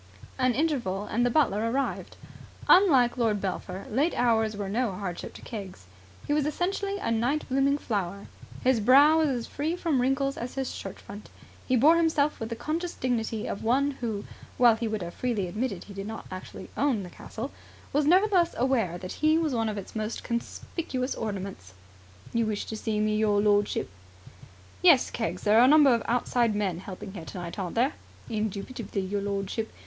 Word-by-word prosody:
An 255 -2 +2
interval 245 -11 0
and 235 +3 0
the 245 - +3
butler 230 -5 +2
arrived. 270 +3 -2 0.5
Unlike 275 -11 +5
Lord 225 -4 +1
Belpher 190 0 -4
late 285 +9 +1
hours 225 -3 +2
were 200 -1 -3
no 225 +3 0
hardship 180 -2 -6
to - - -11
Keggs. 195 - -8 0.4
He 290 - 0
was 295 -1 +1
essentially 395 +5 -1
a 310 - -2
night 245 +7 0
blooming 275 +2 +2
flower. 200 -6 -3 0.4
His 255 -2 +3
brow 280 +8 +6
was 315 -2 +3
as 245 -4 -2
free 310 +4 -2
from 325 -7 0
wrinkles 270 +2 0
as 240 +1 -5
his 265 -1 -2
shirt 195 -1 -7
front. 205 +1 -11 0.4
He 255 - +3
bore 300 +7 +6
himself 310 -3 +2
with 225 - -4
the 230 - -3
conscious 335 +7 -3
dignity 225 -3 -1
of - - -4
one 270 +5 +2
who, 215 -4 -3 0.3
while 240 -2 +6
he 230 +1 -3
would 215 -3 -2
have 170 0 -6
freely 235 -6 -1
admitted 205 0 -3
he 205 - -11
did 195 +1 -6
not 220 0 -7
actually 185 0 -8
own 260 -8 +1
the 180 - -9
castle, - - -7 0.4
was 290 +1 +2
nevertheless 365 0 +4
aware 230 -9 +1
that 185 0 -7
he 310 +1 +4
was 320 -4 0
one 225 -2 0
of 210 - -4
its 200 - -8
most 215 +1 -3
conspicuous 255 +2 -3
ornaments. 195 - -6 0.6
"You 230 -1 +1
wished 210 -1 -3
to 220 - -4
see 215 0 -2
me, 215 0 +1
your 210 -1 +2
lordship?" 205 0 +2 0.9
"Yes. 335 -8 +6
Keggs, 230 - -3
there 215 +1 +5
are 245 - +8
a - - +5
number 290 -1 +7
of 230 - +1
outside 240 -2 +1
men 190 -5 -1
helping 190 0 -8
here 180 -5 -7
tonight, 175 +2 -7
aren't 180 -3 -4
there?" 255 +6 +2 0.4
"Indubitably, 215 0 -3
your 200 +2 -2
lordship. 200 +2 -3
230 Hz, 185 wpm, -27 LUFS, 205-275 Hz, 0.9 s, are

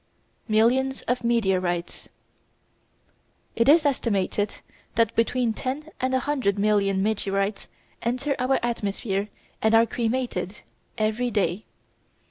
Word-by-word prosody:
Millions 245 +5 +2
of 245 0 -1
Meteorites 185 -7 0 1.5
It 230 +4 +3
is 315 +1 +6
estimated 205 -6 0 0.4
that 230 -1 +2
between 230 0 +1
ten 285 +7 -4
and 260 0 +1
a - - +3
hundred 255 -8 0
million 200 -2 +2
meteorites 200 -1 -1 0.3
enter 255 +4 -1
our 255 +2 +2
atmosphere 205 -3 -2 0.3
and 220 +1 +4
are 225 +1 +6
cremated, 230 -5 -2 0.4
every 220 +3 0
day. 200 -2 -1
225 Hz, 105 wpm, -25 LUFS, 200-250 Hz, 1.5 s, is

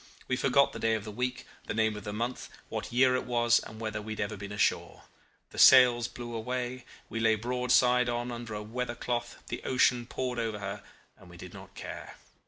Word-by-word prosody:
We 125 - +1
forgot 135 +1 +3
the - - -6
day 115 0 +2
of 110 - -4
the 105 - -7
week, 125 +3 -3 0.2
the - - -3
name 110 -1 +2
of 105 0 -8
the 105 - -3
month, 120 +4 -4 0.2
what - - -5
year 125 +1 +4
it 130 - -2
was, 120 -1 +3
and 110 0 -10
whether 110 -2 -3
we 110 +1 -5
had - - -9
ever 105 0 -2
been 100 0 -8
ashore. 105 0 0 0.5
The - - -7
sails 125 -2 +7
blew 120 -1 -8
away, 125 +2 -4 0.3
she 115 - -1
lay 110 -1 +4
broadside 125 +1 +2
on 120 +1 -2
under 115 -2 -6
a 105 - -5
weather 120 +2 -4
cloth, 120 -1 -4
the - - -4
ocean 125 -2 +2
poured 125 -2 -3
over 110 -2 -2
her, 100 -1 -5 0.4
and - - -16
we - - -13
did - - -10
not - - -12
care. - - -8
120 Hz, 215 wpm, -29 LUFS, 110-125 Hz, 0.5 s, sails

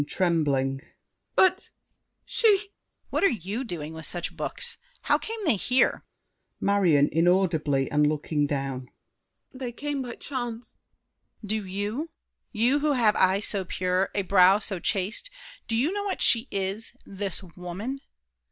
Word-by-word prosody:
(trembling). 140 -7 0 0.5
But—she— 390 +3 +1
DIDIER. 400 +1 -11 0.4
What - - 0
are 395 - +6
you 210 +3 -4
doing 160 - -5
with 160 -2 -2
such 175 -1 -3
books? - - 0 0.2
How - - +2
came 450 +1 -5
they 295 -8 +4
here? 250 +7 +2 0.6
MARION. 175 -8 +3
(inaudibly, 165 -5 +2
and 150 0 +3
looking 150 0 0
down). 135 -3 -4 0.6
They 255 -2 -5
came 285 +3 -4
by 245 -2 -6
chance. 240 -4 -6 0.7
DIDIER. - - -6
Do 210 0 -2
you— 210 - -3 0.4
You 245 +6 +2
who 295 0 +1
have 225 -5 +3
eyes 190 +2 +3
so 200 -2 +3
pure, 185 +1 -1
a 200 - +1
brow 190 +1 +5
so 200 -3 +1
chaste— 195 - 0 0.4
Do 225 - -1
you 265 +9 +1
know 410 0 -3
what 395 - -1
she 230 +2 +5
is—this 195 0 -3
woman? 190 +10 -5
200 Hz, 140 wpm, -26 LUFS, 170-245 Hz, 0.7 s, are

